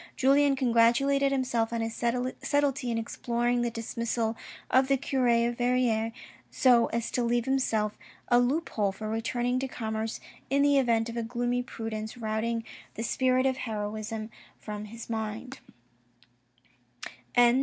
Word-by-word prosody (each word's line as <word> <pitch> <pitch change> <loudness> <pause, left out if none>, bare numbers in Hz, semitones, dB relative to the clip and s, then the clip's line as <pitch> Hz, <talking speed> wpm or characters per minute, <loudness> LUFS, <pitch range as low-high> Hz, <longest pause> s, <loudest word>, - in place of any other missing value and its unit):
Julien 275 +1 +4
congratulated 265 +3 +3
himself 250 -4 0
on 230 -1 -1
his 225 0 -2
subtlety 255 +2 0
in 230 - 0
exploiting 240 +1 -1
the 240 - +1
dismissal 230 0 -2 0.4
of 260 0 +4
the 275 0 +3
cure 260 -1 0 0.2
of 240 0 -2
Verrieres 245 -3 +1 0.4
so 245 -3 +4
as 230 0 -3
to 245 - 0
leave 240 0 +1
himself 225 -6 0 0.3
a 240 - +5
loop 280 +7 +1
hole 205 -3 0
for 215 +3 -7
returning 240 +3 -1
to 265 - -2
commerce 220 -2 -3 0.3
in 280 +2 +3
the 285 -1 +5
event 230 -3 +2
of 230 - -6
a - - 0
gloomy 245 +1 -1
pru 225 -2 -6
dence 220 +2 -5
routing 225 0 -1 0.3
the 225 - -4
spirit 255 +2 +2
of 260 -1 +1
heroism 215 -1 -4 0.3
from 210 -1 -6
his 230 +2 -9
mind. 225 +4 -4
235 Hz, 145 wpm, -28 LUFS, 225-255 Hz, 0.4 s, a